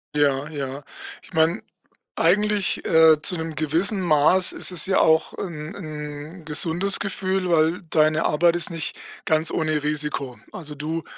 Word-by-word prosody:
Ja, 145 Hz, -1 st, +1 dB
ja. 140 Hz, -2 st, -6 dB, 0.4 s
Ich -, -, -18 dB
meine, 160 Hz, +1 st, +1 dB, 0.5 s
eigentlich, 205 Hz, +3 st, +1 dB
äh, 160 Hz, -1 st, +5 dB
zu 180 Hz, -, +3 dB
'nem 160 Hz, 0 st, -5 dB
gewissen 165 Hz, +7 st, -1 dB
Maß 170 Hz, +2 st, +3 dB
ist -, -, -4 dB
es 170 Hz, -4 st, -1 dB
ja 190 Hz, -, +2 dB
auch 160 Hz, 0 st, +2 dB
'n 155 Hz, -4 st, -7 dB
'n 155 Hz, 0 st, -8 dB
gesundes 165 Hz, +5 st, +3 dB
Gefühl, 190 Hz, -1 st, -2 dB
weil 165 Hz, +1 st, +2 dB
deine 155 Hz, 0 st, +2 dB
Arbeit 170 Hz, +3 st, +2 dB
ist 175 Hz, -, -1 dB
nicht 165 Hz, -2 st, -4 dB, 0.3 s
ganz 155 Hz, 0 st, +2 dB
ohne 155 Hz, -2 st, -1 dB
Risiko. 150 Hz, -4 st, -3 dB, 0.2 s
Also 150 Hz, -4 st, -8 dB
du 155 Hz, +3 st, -4 dB
160 Hz, 150 wpm, -22 LUFS, 150-175 Hz, 0.5 s, äh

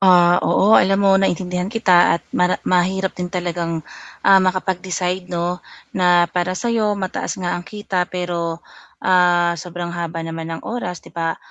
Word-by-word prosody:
Ah, 180 Hz, -2 st, +5 dB
oo 205 Hz, +3 st, +3 dB
alam 195 Hz, +1 st, +2 dB
mo 195 Hz, -, +5 dB
naintindihan 180 Hz, -1 st, -1 dB
kita 185 Hz, -7 st, +4 dB
at -, -, -11 dB
mara 180 Hz, 0 st, +2 dB
mahirap 185 Hz, +1 st, +1 dB
din 180 Hz, -1 st, -5 dB
talagang, 170 Hz, -2 st, -3 dB, 0.4 s
ah, 195 Hz, -1 st, +7 dB
makapag-decide 185 Hz, -1 st, -2 dB
'no, 175 Hz, +1 st, -2 dB, 0.3 s
na 180 Hz, -2 st, +4 dB
para 180 Hz, +1 st, -2 dB
sa'yo 220 Hz, -2 st, 0 dB
mataas 190 Hz, -2 st, -4 dB
nga 180 Hz, -2 st, -3 dB
ang -, -, -2 dB
kita 185 Hz, -2 st, -3 dB
pero, 175 Hz, -2 st, -4 dB, 0.4 s
ah, 175 Hz, -2 st, +3 dB
sobrang 175 Hz, -1 st, -6 dB
haba 165 Hz, -1 st, -4 dB
naman 165 Hz, 0 st, -6 dB
ng -, -, -12 dB
oras 180 Hz, -7 st, -5 dB
'di -, -, -15 dB
ba? 165 Hz, -1 st, -2 dB
180 Hz, 155 wpm, -20 LUFS, 175-185 Hz, 0.4 s, ah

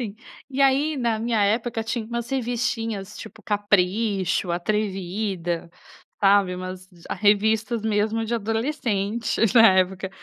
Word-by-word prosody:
Sim. 215 Hz, -4 st, -4 dB, 0.4 s
E 270 Hz, +1 st, -3 dB
aí, 275 Hz, +3 st, +3 dB
na 235 Hz, -3 st, 0 dB
minha 225 Hz, -1 st, 0 dB
época, 225 Hz, +2 st, 0 dB
tinha 225 Hz, 0 st, -3 dB
umas 235 Hz, +1 st, -4 dB
revistinhas, 230 Hz, -5 st, -2 dB
tipo, 220 Hz, 0 st, -11 dB
"Capricho", 200 Hz, -2 st, 0 dB
"Atrevida", 190 Hz, -2 st, -2 dB, 0.5 s
sabe, 195 Hz, -2 st, +4 dB
umas 185 Hz, 0 st, -7 dB, 0.2 s
ah, -, -, -1 dB
revistas, 215 Hz, +2 st, +2 dB
mesmo, 220 Hz, +1 st, 0 dB
de 225 Hz, +1 st, -3 dB
adolescentes, 225 Hz, -1 st, -1 dB
na 225 Hz, -2 st, +8 dB
época. 190 Hz, +1 st, 0 dB
215 Hz, 125 wpm, -24 LUFS, 195-230 Hz, 0.5 s, na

